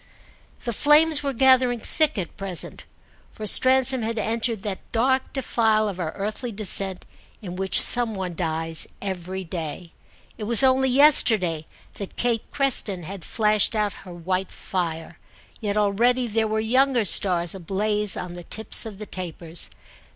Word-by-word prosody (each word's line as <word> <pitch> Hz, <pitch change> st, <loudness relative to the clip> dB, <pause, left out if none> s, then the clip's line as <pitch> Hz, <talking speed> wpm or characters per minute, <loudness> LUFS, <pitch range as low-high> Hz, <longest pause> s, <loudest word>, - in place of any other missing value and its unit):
The 235 Hz, -, -4 dB
flames 300 Hz, +5 st, +2 dB
were 280 Hz, -1 st, -3 dB
gathering 255 Hz, -1 st, +2 dB
thick 305 Hz, +3 st, -1 dB
at 180 Hz, -4 st, -6 dB
present, 190 Hz, -3 st, -8 dB, 0.5 s
for 215 Hz, -, -9 dB
Stransom 260 Hz, +3 st, +6 dB
had 225 Hz, +1 st, -5 dB
entered 225 Hz, 0 st, -2 dB
that 200 Hz, -3 st, -8 dB
dark 260 Hz, +3 st, -1 dB
defile 220 Hz, -5 st, -1 dB
of 190 Hz, -3 st, -7 dB
our 160 Hz, -3 st, -4 dB
earthly 215 Hz, +5 st, -6 dB
descent 195 Hz, -3 st, -3 dB, 0.4 s
in 180 Hz, -2 st, -8 dB
which 190 Hz, +1 st, +8 dB
some 240 Hz, -3 st, +9 dB
one 185 Hz, -2 st, -6 dB
dies 165 Hz, -1 st, -2 dB
every 190 Hz, -1 st, -7 dB
day. 165 Hz, 0 st, -8 dB, 0.5 s
It 210 Hz, -, -6 dB
was 235 Hz, +4 st, +4 dB
only 265 Hz, 0 st, +2 dB
yesterday 220 Hz, -, +2 dB, 0.3 s
that 200 Hz, -, -10 dB
Kate 235 Hz, -2 st, -3 dB
Creston 225 Hz, -10 st, -3 dB
had 190 Hz, +2 st, -10 dB
flashed 215 Hz, 0 st, 0 dB
out 210 Hz, -2 st, -2 dB
her 185 Hz, -, -13 dB
white 185 Hz, +2 st, -5 dB
fire; 165 Hz, -3 st, -6 dB, 0.4 s
yet 210 Hz, -1 st, -4 dB
already 235 Hz, +5 st, 0 dB
there 220 Hz, 0 st, -2 dB
were 215 Hz, 0 st, -3 dB
younger 250 Hz, +1 st, 0 dB
stars 175 Hz, -2 st, +1 dB
ablaze 205 Hz, +3 st, -2 dB
on 180 Hz, -1 st, -7 dB
the 175 Hz, 0 st, -11 dB
tips 220 Hz, +3 st, -2 dB
of 210 Hz, -3 st, -11 dB
the 210 Hz, -, -9 dB
tapers. 170 Hz, -3 st, -6 dB
210 Hz, 150 wpm, -22 LUFS, 185-240 Hz, 0.5 s, some